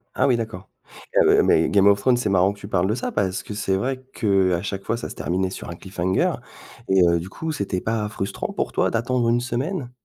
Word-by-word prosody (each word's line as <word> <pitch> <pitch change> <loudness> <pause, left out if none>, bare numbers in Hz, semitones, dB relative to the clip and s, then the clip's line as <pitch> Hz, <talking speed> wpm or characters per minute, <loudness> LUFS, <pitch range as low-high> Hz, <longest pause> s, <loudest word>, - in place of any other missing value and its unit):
Ah - - +2
oui, 125 -3 +3
d'accord. 110 -5 -6 0.5
Heu, - - +5
mais 80 - +3
Game 100 -1 +4
of 100 0 +5
Thrones, 125 +3 +3
c'est 120 -4 -1
marrant 95 0 +3
que 100 - -17
tu 100 - -8
parles 95 -2 +1
de 110 - +1
ça 120 - -3
parce 95 -2 -1
que - - -7
c'est 95 -2 0
vrai 130 +6 -2
qu'à 95 -5 +2
chaque 100 -1 -4
fois 115 - -1
ça 120 - -5
se - - -8
terminait 95 +2 -1
sur - - -7
un 85 - -6
cliffhanger 95 0 -1 0.5
et 95 -1 +4
heu, 85 0 +3
du 85 +3 -7
coup 160 +10 -4
c'était 100 -9 -2
pas 110 -2 -1
frustrant 100 -2 -4
pour - - -2
toi - - +1
d'attendre 120 +1 0
une 120 +1 +3
semaine? 125 +4 -3
100 Hz, 240 wpm, -23 LUFS, 95-120 Hz, 0.5 s, Heu